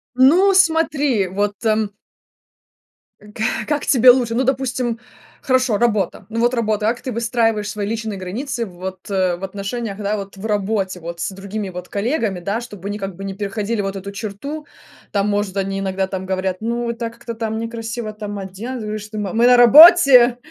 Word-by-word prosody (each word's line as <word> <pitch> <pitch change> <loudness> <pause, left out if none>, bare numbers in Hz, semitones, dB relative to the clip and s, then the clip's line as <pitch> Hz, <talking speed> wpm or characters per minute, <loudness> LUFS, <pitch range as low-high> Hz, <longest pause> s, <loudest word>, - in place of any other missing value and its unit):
Ну, 345 +10 +5
смотри, 310 - +2
вот, 205 +3 -1
эм 215 -1 +1 1.3
К 210 +1 -3
как 295 -1 -1
тебе 250 -1 +7
лучше? 245 -2 0
Ну, 255 +3 +1
допустим, 250 -3 -1 0.4
хорошо, 255 -5 +2
работа, 210 -5 0
ну 230 - -3
вот 240 +2 +2
работа, 215 -3 0
как 235 +3 0
ты 255 - -5
выстраиваешь 225 -2 0
свои 210 -2 -3
личные 220 -1 -3
границы 230 +7 -4
вот, 185 +1 -8
э, 185 -2 +1
в 180 - -12
отношениях, 200 +2 -4
да, 210 0 -1
вот 200 -1 -7
в 195 - -8
работе, 200 -3 -1
вот 170 +1 -7
с - - -2
другими 200 +2 -5
вот 180 0 -8
коллегами, 215 - -1
да, 200 +6 -2
чтобы 205 -5 -9
они 205 +1 -3
как 195 -3 -5
бы 195 - -7
не 195 - -4
переходили 205 +2 -3
вот 195 0 -4
эту 200 +1 -7
черту? 225 +10 -6 0.5
Там, 200 0 0
может, 205 -1 -1
они 195 0 -2
иногда 190 0 -1
там 190 -1 -5
говорят: 190 0 -2
"Ну, 235 +1 -2
это 230 0 -4
как-то 235 0 -8
там 220 -1 -3
некрасиво 230 -1 -5
там 205 -1 -6
оденусь. 215 +6 -6
Вы 210 0 -3
что, 210 +1 -9
мы, 200 -3 -3
мы 235 +2 +4
на 250 0 +6
работе! 260 -2 +8
215 Hz, 185 wpm, -20 LUFS, 195-240 Hz, 1.3 s, работе